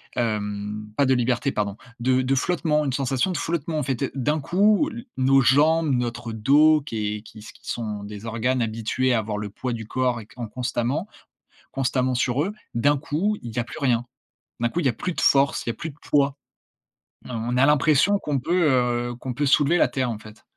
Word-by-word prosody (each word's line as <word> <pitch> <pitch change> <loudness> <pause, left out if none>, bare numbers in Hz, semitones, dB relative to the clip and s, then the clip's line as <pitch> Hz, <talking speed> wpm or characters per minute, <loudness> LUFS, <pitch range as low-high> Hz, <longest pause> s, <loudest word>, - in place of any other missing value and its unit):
hem, 105 -2 -2
pas 140 - +3
de 130 - +3
liberté, 125 +2 +1
pardon, 100 -1 -2 0.2
de 130 +1 +2
de 135 +1 +1
flottement, 150 0 +1
une 135 - -1
sensation 135 +6 0
de - - -2
flottement, 165 -1 -2
en - - -1
fait, 135 0 -1
d'un 150 +4 0
coup, 205 - +3
l 235 -4 -8
nos 135 +1 +4
jambes, 155 +5 +4
notre 120 -1 -2
dos 145 +8 +5
qui 110 -6 -3
est 105 - -10
qui 110 - -13
qui 110 - -11 0.2
sont 105 -3 -4
des 105 +1 -8
organes 120 +3 0
habitués 115 +3 0
à 115 - +3
avoir 105 -1 -3
le 105 0 -4
poids 125 +5 -4
du 115 -2 -5
corps 125 0 -1
et 110 - -15
en 120 -2 -4
constamment 125 - -2 0.6
constamment 130 -1 0
sur 125 +2 +1
eux. 200 - -4 0.2
D'un 145 +5 +3
coup, 170 +9 -1
il 120 -2 -7
y - - -1
a 120 - -1
plus - - -9
rien, 120 -4 +1 0.5
d'un 120 - +1
coup, 170 - -2
il 165 - -1
y - - +6
a 125 - +2
plus 180 - -4
de - - -3
force, 140 0 +3
il - - -5
y - - +2
a - - -12
plus 160 +7 -6
de 140 - -18
poids, 140 -1 +2 0.9
heu, - - -8
on 120 +2 -2
a 130 - +5
l'impression 150 +7 +4
qu'on 145 -6 -1
peut, 170 +3 +2 0.4
heu, 120 - -5
qu'on 125 +1 -5
peut 145 +4 -1
soulever 145 +4 +4
la 145 - +3
terre, 125 -1 -1
en 110 - -4
fait 110 0 -14
130 Hz, 220 wpm, -24 LUFS, 115-145 Hz, 0.9 s, y